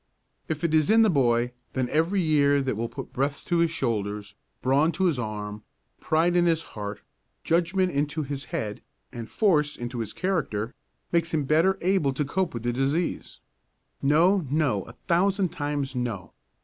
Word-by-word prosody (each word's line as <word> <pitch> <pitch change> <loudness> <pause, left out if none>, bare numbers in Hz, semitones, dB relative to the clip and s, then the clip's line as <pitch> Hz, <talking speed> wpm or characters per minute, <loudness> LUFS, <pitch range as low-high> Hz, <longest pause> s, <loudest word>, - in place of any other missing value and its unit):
If 160 +1 -3
it 165 -2 +1
is 155 -2 +3
in 225 +1 +6
the 215 - +4
boy, 120 -4 +2 0.2
then 130 -1 0
every 165 +6 +1
year 145 -3 +3
that 130 -4 -1
will 115 +2 -3
put 115 - -8
breadth 140 +2 -1
to 175 - +1
his 170 0 +3
shoulders, 105 -8 -2 0.3
brawn 140 +5 +3
on 190 - +3
his 150 -7 0
arm, 105 -2 -5 0.4
pride 165 +3 +2
in 175 0 +4
his 165 -1 +2
heart, 105 -1 -6 0.4
judgment 180 +2 +1
into 150 +2 -1
his 140 0 -5
head 105 -1 -4 0.3
and 115 -2 -7
force 150 -8 +2
into 120 0 -5
his 110 -2 -3
character, 130 - -2 0.4
makes 170 -1 +1
him 150 - +1
better 165 +7 +3
able 175 -7 +2
to 145 +2 -1
cope 180 +1 -1
with 115 - -5
the 120 0 0
disease. 140 +7 -2 0.6
No, 170 +7 +4
no, 140 -9 +1
a 115 - -12
thousand 190 +2 +2
times 145 -2 -3
no! 110 -9 -4
145 Hz, 175 wpm, -26 LUFS, 120-170 Hz, 0.6 s, in